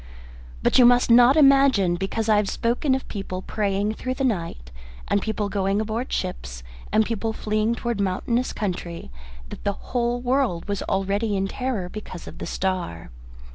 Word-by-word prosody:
But - - +4
you 250 - +8
must 245 0 +4
not 245 +4 +7
imagine, 275 - +5
because 195 +5 -2
I 215 -1 +4
have 205 -2 +1
spoken 245 +4 +1
of 265 - -5
people 190 -3 -5
praying 205 0 -1
through 255 +3 -4
the 270 - -2
night 165 - -2 0.4
and 200 - +1
people 215 -1 -2
going 195 0 0
aboard 220 +4 -3
ships 60 - -4 0.3
and 220 0 +3
people 225 0 -2
fleeing 215 +2 0
towards 235 -3 -2
mountainous 230 +6 0
country, 175 - -4 0.4
that - - -9
the 200 - 0
whole 240 +2 -2
world 245 -9 0
was 200 -1 -2
already 200 +2 0
in 195 - 0
a - - -4
terror 250 -8 -2
because 185 -2 -8
of - - -10
the - - -5
star. 180 - -3
215 Hz, 175 wpm, -24 LUFS, 190-240 Hz, 0.4 s, you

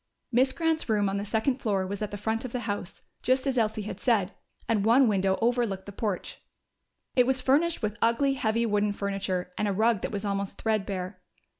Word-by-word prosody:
Miss 255 +2 +4
Grant's 320 -2 0
room 205 -2 +2
on 195 - -1
the 200 - -3
second 225 +5 0
floor 200 -5 0
was 200 +2 -5
at 210 - -2
the 205 - -6
front 220 +2 -1
of 255 - -5
the 250 - -3
house, 205 -4 -5 0.2
just 260 +1 +2
as 265 -3 +2
Elsie 220 -1 0
had 200 -1 -6
said, 210 -6 +2 0.3
and 220 -3 +1
one 240 +4 +5
window 190 -2 +2
overlooked 230 -5 +1
the 200 - -8
porch. 205 -1 -4 0.7
It 250 -1 +5
was 265 0 +2
furnished 285 +4 +2
with 210 0 -2
ugly, 235 +5 +3
heavy 230 -3 0
wooden 210 -1 +1
furniture, 195 -3 -2
and 210 - +1
a 200 - 0
rug 220 0 +2
that - - -3
was 205 0 -3
almost 200 -1 -2
threadbare. 195 -4 -2
215 Hz, 205 wpm, -28 LUFS, 200-245 Hz, 0.7 s, one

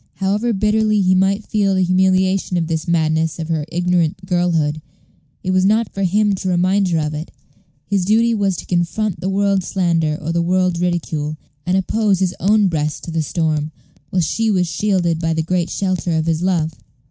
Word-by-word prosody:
However 205 +5 0
bitterly 215 +1 +2
he 185 -1 +3
might 195 +3 +1
feel 200 -3 +1
the 185 - +2
humiliation 185 0 +2
of 165 - 0
this 160 +1 -3
madness 160 -2 +1
of 165 -1 -5
her 155 -2 -1
ignorant 180 0 0
girlhood, 165 -4 0 0.6
it 185 - -1
was 185 0 +2
not 215 +3 +2
for 195 - -4
him 205 +3 +2
to 190 0 -3
remind 185 +2 +2
her 170 -2 0
of 150 -1 -1
it; 150 +3 -5 0.6
his 195 -1 0
duty 225 +4 +3
was 200 -4 0
to - - -7
confront 180 +3 -1
the 190 - -1
world's 195 -1 +1
slander 165 -5 0
or 160 +2 -4
the 170 0 +1
world's 180 0 +1
ridicule, 155 -4 -2 0.3
and 185 +1 +2
oppose 205 +1 +1
his 185 -1 0
own 205 +1 +3
breast 155 -3 -2
to 170 - -6
the 165 0 0
storm, 155 -1 -1 0.4
while 180 -2 +1
she 225 +8 0
was 185 -4 +2
shielded 175 -2 0
by 165 -1 -1
the 160 - 0
great 175 +1 -1
shelter 185 -3 -1
of 160 - 0
his 165 -1 0
love. 170 -4 0
180 Hz, 195 wpm, -19 LUFS, 165-195 Hz, 0.6 s, he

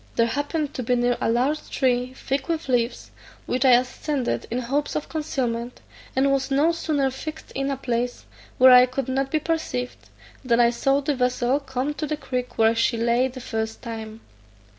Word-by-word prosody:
There 230 - +4
happened 290 +4 -2
to - - -4
be 250 +1 +1
near 245 0 +2
a - - +1
large 260 +6 0
tree 255 -1 0
thick 270 0 -3
with 330 -2 -2
leaves, 245 -2 -1 0.3
which 255 +1 0
I 260 -2 +6
ascended 255 +2 0
in 235 - -2
hopes 270 +4 -1
of 305 - -2
concealment, 250 -6 -3 0.4
and 275 +1 +3
was 270 -1 0
no 285 +5 +3
sooner 300 -5 0
fixed 310 +4 -8
in 275 +1 -2
a 275 - -2
place 245 -1 -2 0.3
where 260 0 +8
I 250 0 +8
could 255 0 -3
not 265 +1 -1
be 310 - +1
perceived, 305 -6 -3 0.3
than 240 -2 +2
I 235 0 +5
saw 270 +3 +1
the 290 +1 0
vessel 250 +1 +1
come 265 +1 -3
to 305 +1 -4
the 305 +1 -2
creek 250 -3 -4
where 225 0 +4
she 230 +1 +1
lay 235 +2 +2
the 255 0 -9
first 220 -2 -4
time. 220 -2 -7
255 Hz, 190 wpm, -24 LUFS, 245-280 Hz, 0.4 s, where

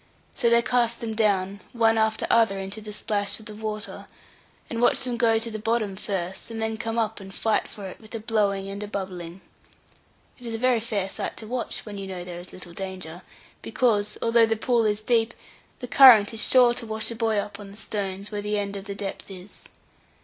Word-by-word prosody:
So 240 -4 +2
they 235 0 +5
cast 240 -2 +1
them 225 -1 -4
down, 200 -3 +1
one 225 -2 +4
after 220 0 +1
other 225 -4 +4
into 195 +3 -5
the 210 0 -8
splash 205 0 0
of 220 - -13
the 215 - -8
water, 215 0 -5 0.6
and 230 0 -3
watch 245 - +4
them 250 -2 -1
go 230 -1 +3
to 230 +1 -2
the 215 - -5
bottom 215 -2 0
first, 190 -1 -4
and 225 -1 -5
then 220 0 -1
come 225 +1 -3
up 220 -1 0
and 195 -1 -10
fight 220 +3 0
for 205 -3 -7
it, 185 - -8
with 220 +1 -11
a - - -3
blowing 205 -3 0
and 200 +1 -6
a 210 - -4
bubbling. 185 -3 -6 1.0
It 245 - -9
is 225 - -3
a - - -2
very 250 0 +3
fair 210 -4 -2
sight - - -5
to 220 - -8
watch 245 +1 -3
when 205 -2 -7
you 195 - -5
know 185 -2 -5
there 175 -1 -7
is 175 - -10
little 175 -2 -10
danger, 185 -2 -6 0.4
because, 210 -4 +1
although 230 0 +5
the 225 0 0
pool 235 0 +2
is 210 0 +1
deep, 225 0 +2 0.4
the 250 - -7
current 235 -5 +8
is 225 - -2
sure 250 -2 +6
to 235 -1 -4
wash 220 +1 -2
a - - -5
boy 225 -1 +1
up 205 0 -3
on 205 -1 -9
the 200 - -13
stones, 200 -2 -4
where 205 -1 -3
the 210 +1 -1
end 200 0 -2
of 195 0 -6
the 200 -1 -5
depth 200 0 -6
is. 190 +1 -11
215 Hz, 225 wpm, -25 LUFS, 200-230 Hz, 1.0 s, current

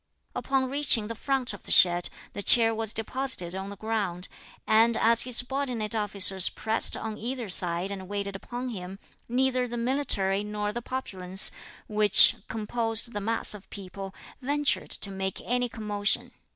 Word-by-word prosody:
Upon 265 -1 -1
reaching 260 -6 +2
the - - -4
front 260 0 -3
of 205 - -13
the - - -2
shed 175 -1 +7 0.2
the - - -6
chair 225 +2 +5
was 225 -1 -1
deposited 225 -5 0
on 190 +1 -6
the 200 - -10
ground, 200 -5 -4 0.4
and 225 +1 +3
as 230 0 +3
his 250 -2 +2
subordinate 245 -4 -2
officers 195 -3 +2
pressed 220 +1 +1
on 220 -1 -7
either 240 -1 -5
side 180 +1 +1
and 190 -2 -7
waited 200 0 -5
upon 245 +5 -7
him, 190 -4 -8 0.3
neither 255 0 0
the 240 0 -6
military 230 -6 +1
nor 210 0 -4
the 240 - -5
populace, 190 -7 -1 0.3
which 210 -1 +6
composed 225 +1 -2
the 205 - -4
mass 225 +2 -2
of 210 -2 -12
people, 195 0 -9 0.3
ventured 285 +2 -1
to 200 - +2
make 190 0 -5
any 245 0 -1
commotion. 210 -3 -1
220 Hz, 160 wpm, -26 LUFS, 195-245 Hz, 0.4 s, shed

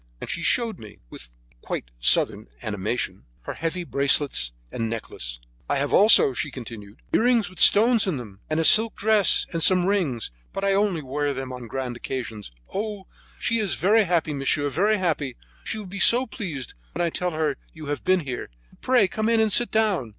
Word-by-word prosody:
And - - -5
she 170 - -4
showed 230 +4 0
me, 105 -2 -13
with - - -11 0.3
quite - - -6
southern - - +2 0.2
animation, 100 -1 -3 0.2
her - - -6
heavy 165 +3 -4
bracelets 140 - +1 0.2
and 115 -1 -3
necklace. 60 - -6 0.3
"I 145 - +1
have 140 +1 -2
also," 200 -9 +6
she - - -2
continued, 110 -4 -10
"earrings 230 -5 +2
with 185 - -14
stones 225 0 +6
in 175 -7 -1
them, 105 -6 -10
a 155 +1 0
silk 220 +6 +6
dress, 215 -1 +4
and 165 - -2
some 180 +1 +4
rings; 170 - -1 0.2
but 195 - -5
I 195 0 +2
only 195 -5 0
wear 140 +1 -2
them 130 -1 -6
on 125 -2 -9
grand 125 0 -5
occasions. 115 - -6 0.2
Oh! 205 -1 -4 0.3
she 230 -1 -1
is 205 -4 -2
very 215 +3 +3
happy, 165 -3 0
monsieur, 145 +1 -1
very 205 +9 +1
happy. 155 -8 -2 0.3
She 220 - -4
will 215 - -7
be 195 +2 -8
so 245 +6 +5
pleased 165 - -7 0.2
when 175 +2 -1
I 170 - -2
tell 180 +2 -2
her 155 -3 -2
you 155 -2 -11
have 145 0 -4
been 185 -1 +2
here. 130 -5 -6 0.2
But - - -25
pray 250 -6 +3
come 215 +4 -2
in 230 -1 +2
and 220 -1 +2
sit 240 - +5
down. 210 - 0
165 Hz, 195 wpm, -23 LUFS, 130-205 Hz, 0.3 s, also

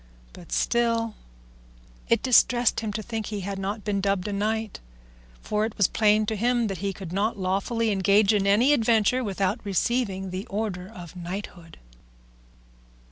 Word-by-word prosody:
But - - -13
still 230 - +1 1.0
it 230 - +2
distressed 245 -1 +4
him 220 -2 -3
to 215 0 -4
think 225 0 -4
he 210 -2 -4
had 195 +1 -4
not 200 +2 -4
been 200 -1 -1
dubbed 195 -1 0
a 205 - -3
knight, 215 +1 -2 0.6
for 210 0 0
it 220 0 -3
was 200 - +4
plain 215 0 +3
to 220 - -2
him 240 +2 +1
he 195 +1 -3
could 180 -2 -8
not 215 +4 0
lawfully 200 +4 0
engage 200 +2 +3
in 200 -1 +1
any 235 +8 +4
adventure 230 0 +2
without 200 +1 -1
receiving 195 -1 -1
the 190 +5 -5
order 200 -4 -3
of 175 -5 -11
knighthood. 175 -1 -7
210 Hz, 155 wpm, -25 LUFS, 195-225 Hz, 1.0 s, distressed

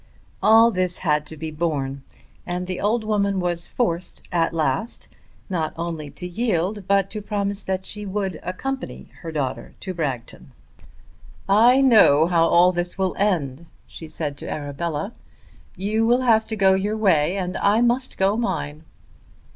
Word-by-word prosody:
All 225 +2 +6
this 185 -3 -1
had 150 -1 +1
to 160 - -8
be 160 +1 -5
borne, 145 -4 -2 0.4
and 180 0 -3
the 185 0 -4
old 220 +3 +1
woman 200 -2 0
was 175 -1 -2
forced 180 -8 -2
at 170 -2 +1
last 160 - -2 0.4
not 165 -5 -2
only 165 -3 -4
to 180 - -7
yield 195 0 -1
but 195 -1 +2
to 215 - -5
promise 200 0 -2
that 190 0 -3
she 210 0 -6
would 190 -4 -3
accompany 265 +9 -5
her 165 -3 -6
daughter 140 -5 -4
to 190 - -4
Bragton. 135 -9 -5 0.9
"I 235 +7 +5
know 205 - +6
how 165 -1 +3
all 175 +2 +5
this 175 0 -3
will 190 -1 0
end," 170 -7 0 0.2
she 160 - -10
said 150 -2 -4
to - - -7
Arabella. 150 +6 -4 0.6
"You 215 +4 0
will 245 +2 +3
have 225 -3 +3
to 220 - -3
go 195 -2 +4
your 205 +3 0
way 180 -4 +2
and 180 -1 -3
I 210 +3 +3
must 245 +2 +1
go 195 +2 +2
mine." 160 -10 -3
185 Hz, 160 wpm, -23 LUFS, 160-210 Hz, 0.9 s, All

